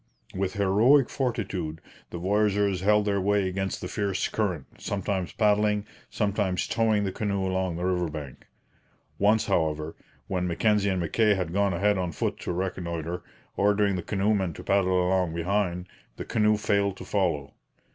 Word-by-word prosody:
With 95 Hz, 0 st, -2 dB
heroic 110 Hz, +8 st, +4 dB
fortitude 100 Hz, -, -2 dB, 0.3 s
the -, -, -6 dB
voyageurs 100 Hz, 0 st, +1 dB
held 105 Hz, +1 st, +3 dB
their 100 Hz, -1 st, +1 dB
way 100 Hz, 0 st, +2 dB
against 95 Hz, +1 st, -3 dB
the -, -, -4 dB
fierce 100 Hz, -2 st, -1 dB
current, 90 Hz, -10 st, -1 dB
sometimes 95 Hz, -2 st, -2 dB
paddling, 105 Hz, -1 st, +2 dB, 0.2 s
sometimes 100 Hz, -3 st, 0 dB
towing 110 Hz, -2 st, +2 dB
the 95 Hz, -, -1 dB
canoe 100 Hz, -1 st, -1 dB
along 95 Hz, -2 st, -1 dB
the 90 Hz, +2 st, -3 dB
river 90 Hz, -2 st, 0 dB
bank. 75 Hz, -4 st, -8 dB, 0.7 s
Once, 105 Hz, +2 st, +3 dB
however, 80 Hz, 0 st, 0 dB, 0.3 s
when 90 Hz, -2 st, -1 dB
Mackenzie 100 Hz, +3 st, +2 dB
and 95 Hz, -1 st, 0 dB
Mackay 105 Hz, +5 st, +2 dB
had 90 Hz, -3 st, -3 dB
gone 100 Hz, -1 st, +2 dB
ahead 100 Hz, +2 st, +2 dB
on 90 Hz, -2 st, -2 dB
foot -, -, -2 dB
to -, -, -4 dB
reconnoitre, 85 Hz, -2 st, -3 dB, 0.3 s
ordering 100 Hz, 0 st, +2 dB
the 90 Hz, -, -2 dB
canoemen 100 Hz, -2 st, 0 dB
to -, -, -10 dB
paddle 95 Hz, -2 st, +2 dB
along 90 Hz, -3 st, +1 dB
behind, 90 Hz, 0 st, -1 dB, 0.3 s
the -, -, -6 dB
canoe 105 Hz, 0 st, +2 dB
failed 100 Hz, -2 st, 0 dB
to -, -, -9 dB
follow. 85 Hz, -9 st, -1 dB
95 Hz, 155 wpm, -27 LUFS, 90-105 Hz, 0.7 s, heroic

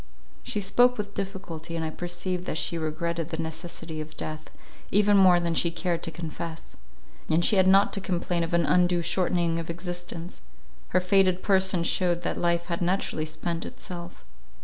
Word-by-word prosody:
She 210 Hz, -, -3 dB
spoke 245 Hz, +6 st, +4 dB
with 205 Hz, -1 st, -4 dB
difficulty, 180 Hz, -5 st, -5 dB
and 165 Hz, -1 st, -1 dB
I 155 Hz, -, -3 dB
perceived 175 Hz, +1 st, -3 dB
that -, -, -2 dB
she 170 Hz, -, -1 dB
regretted 165 Hz, +1 st, -2 dB
the 160 Hz, -, -4 dB
necessity 160 Hz, 0 st, -5 dB
of 155 Hz, 0 st, -10 dB
death, 155 Hz, 0 st, -6 dB, 0.4 s
even 205 Hz, +1 st, +4 dB
more 185 Hz, -3 st, +7 dB
than 170 Hz, -1 st, 0 dB
she 170 Hz, -, +2 dB
cared 170 Hz, 0 st, -2 dB
to -, -, -3 dB
confess. 165 Hz, 0 st, -7 dB, 0.5 s
Yet 165 Hz, +2 st, +3 dB
she 210 Hz, -, +4 dB
had 185 Hz, 0 st, +5 dB
not 195 Hz, +1 st, +5 dB
to 195 Hz, -, -1 dB
complain 175 Hz, -2 st, -1 dB
of 165 Hz, +1 st, -1 dB
an 170 Hz, -1 st, +3 dB
undue 175 Hz, -1 st, +3 dB
shortening 170 Hz, -1 st, +1 dB
of 165 Hz, -, -6 dB
existence; 175 Hz, 0 st, -6 dB, 0.5 s
her -, -, +2 dB
faded 185 Hz, 0 st, +3 dB
person 190 Hz, -3 st, +3 dB
shewed 175 Hz, 0 st, +1 dB
that -, -, -2 dB
life 170 Hz, 0 st, +1 dB
had 170 Hz, 0 st, -3 dB
naturally 175 Hz, -3 st, 0 dB
spent 165 Hz, +2 st, -3 dB
itself. 175 Hz, -1 st, -8 dB
175 Hz, 175 wpm, -27 LUFS, 165-185 Hz, 0.5 s, more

